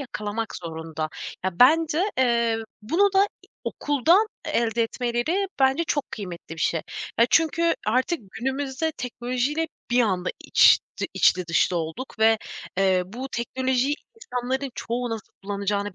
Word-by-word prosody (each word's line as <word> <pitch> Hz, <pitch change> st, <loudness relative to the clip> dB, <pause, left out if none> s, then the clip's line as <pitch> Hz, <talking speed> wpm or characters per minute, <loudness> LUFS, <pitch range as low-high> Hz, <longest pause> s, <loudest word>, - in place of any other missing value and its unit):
yakalamak 225 Hz, -4 st, -4 dB
zorunda. 160 Hz, -2 st, -5 dB, 0.4 s
Ya, 185 Hz, +1 st, -2 dB
bence, 325 Hz, +7 st, +5 dB
eee, 235 Hz, -3 st, +3 dB, 0.3 s
bunu 370 Hz, -, +3 dB
da, 390 Hz, +1 st, +6 dB, 0.2 s
iii, -, -, -21 dB, 0.2 s
okuldan 320 Hz, -, +3 dB, 0.2 s
e -, -, -3 dB
elde 230 Hz, 0 st, +1 dB
etmeleri 245 Hz, -, -1 dB
bence 270 Hz, +5 st, +3 dB
çok 290 Hz, -3 st, -2 dB
kıymetli 175 Hz, -5 st, -7 dB
bir -, -, -8 dB
şey. 165 Hz, -, +1 dB, 0.4 s
Ya, 235 Hz, -, +6 dB
çünkü 335 Hz, +1 st, +3 dB
artık 255 Hz, +9 st, +1 dB
günümüzde 270 Hz, +5 st, -2 dB
teknolojiyle 255 Hz, +5 st, -2 dB, 0.2 s
bir 245 Hz, -, +4 dB
anda 185 Hz, -4 st, 0 dB
iç -, -, +6 dB, 0.2 s
ti -, -, -2 dB
iç -, -, +6 dB
içli 180 Hz, -2 st, -5 dB
dışlı 175 Hz, +1 st, +2 dB
olduk 165 Hz, +10 st, -5 dB
ve, 220 Hz, 0 st, +5 dB, 0.4 s
eee, 190 Hz, -2 st, +3 dB
bu 245 Hz, +7 st, -6 dB
teknolojiyi 260 Hz, +3 st, 0 dB, 0.2 s
insanların 265 Hz, -, -3 dB
çoğu 240 Hz, +1 st, -3 dB
nasıl 225 Hz, -2 st, -6 dB
kullanacağını 200 Hz, 0 st, -2 dB
245 Hz, 145 wpm, -25 LUFS, 205-285 Hz, 0.4 s, da